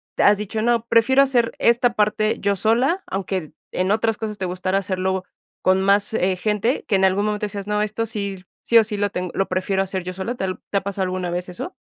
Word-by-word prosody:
te - - +1
has 205 0 +6
dicho, 210 +1 -3
no, 235 -1 +2
prefiero 235 +4 +4
hacer 245 -4 +2
esta 240 +1 +3
parte 215 +1 +1
yo 200 0 +1
sola, 245 - +1
aunque, 195 0 -3
eh, 155 -4 -7 0.2
en 185 +2 0
otras 220 0 +1
cosas 215 -2 -5
te 185 - -2
gustara 185 +1 -1
hacerlo 190 -1 -2 0.4
con 185 0 +3
más, 200 +3 +2
eh, 185 -2 +1
gente, 215 +6 0
que 205 - +2
en 190 - +4
algún 190 +2 +2
momento 210 0 -1
dijeras, 200 0 -7
no, 210 0 0
esto 215 +2 -2
sí, 200 -3 -4 0.2
sí 235 - +4
o 225 - +4
sí 210 -1 -4
lo 205 0 0
tengo, 180 0 -3
lo 195 - 0
prefiero 190 +1 0
hacer 190 -1 -3
yo 185 +1 -5
sola, 190 +6 -3
¿te 190 - -3
ha, - - -2
al 185 - -4
te 200 - +1
ha - - +1
pasado 195 0 -3
alguna 185 -1 -2
vez 180 +1 -3
eso? 180 - -6
200 Hz, 245 wpm, -22 LUFS, 190-220 Hz, 0.4 s, has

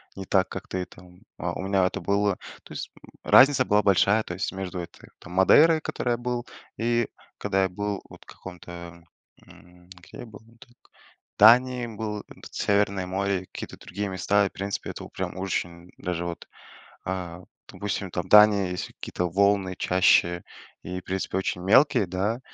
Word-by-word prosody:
не 95 - -7
так 95 0 +2
как - - -7
ты 90 -1 -3
там 90 +2 -17 0.2
а 85 -1 -3
у - - -5
меня 95 -1 +2
это 90 - -2
было 100 -1 +1 0.3
то - - -12
есть, - - -6
м, - - -15
разница 135 -1 +6
была 105 0 +3
большая, 100 +2 +3
то 90 - -6
есть 95 - -3
между 95 -1 -5
этой 85 - -10
там 90 - -12
Мадейрой, 155 - +6
в - - -21
которой 125 - -3
я 120 - +1
был, 120 0 -3 0.3
и 120 0 +1 0.3
когда 95 -1 +1
я 95 - +1
был 100 +2 -4
вот - - -14
в - - -39
каком-то, 85 -1 -11 0.4
м 90 +1 -19
где 90 -1 -14
я - - -7
был 105 -1 -12
не 115 +1 -22
так 120 - -18 0.6
в - - -75
Дании 125 +3 +6
был, 105 -2 -5
п - - -17
Северное 100 -2 0
море, 95 0 -1
какие-то - - -8
другие 100 +3 -5
места. 100 +2 +2
И, 100 - -2
в - - -39
принципе, 100 +1 -4
это - - -9
вот - - -11
прям - - -4
очень 90 -2 -4
даже 85 -1 -3
вот, 85 -1 -6 0.6
а, 90 -2 -4 0.3
допустим, 100 -2 -4
там 90 - -4
Дания 105 -3 +6
есть 90 -1 -4
какие-то 90 - -4
волны 100 +1 +2
чаще 90 -2 +3 0.4
и, 90 +2 -5
в - - -24
принципе, 95 0 -2
очень 95 -1 -2
мелкие, 120 +2 +4
да, 100 +7 -2
95 Hz, 190 wpm, -25 LUFS, 90-105 Hz, 0.6 s, разница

